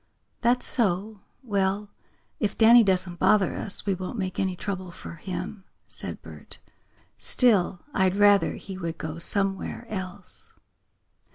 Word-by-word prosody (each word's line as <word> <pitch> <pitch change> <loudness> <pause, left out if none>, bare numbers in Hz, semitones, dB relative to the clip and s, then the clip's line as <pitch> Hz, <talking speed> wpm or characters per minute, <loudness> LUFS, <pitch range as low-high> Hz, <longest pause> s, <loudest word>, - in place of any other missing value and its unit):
"That's 245 +1 +2
so. 210 -2 0 0.2
Well, 200 -2 -1 0.5
if 210 -2 -1
Danny 230 +1 +8
doesn't 185 -3 0
bother 205 -3 +4
us 200 - +2
we 200 - +1
won't 185 +5 -5
make 185 -3 -3
any 190 -1 0
trouble 185 0 -4
for 170 - -9
him," 185 +3 -6 0.2
said - - -7
Bert. - - -9 0.6
"Still, 200 -7 +2
I'd 190 -1 +2
rather 205 -1 +4
he 190 -1 -8
would 165 -2 -4
go 160 +1 -5
somewhere 195 +5 0
else." 190 -1 -7
195 Hz, 130 wpm, -26 LUFS, 185-210 Hz, 0.6 s, Danny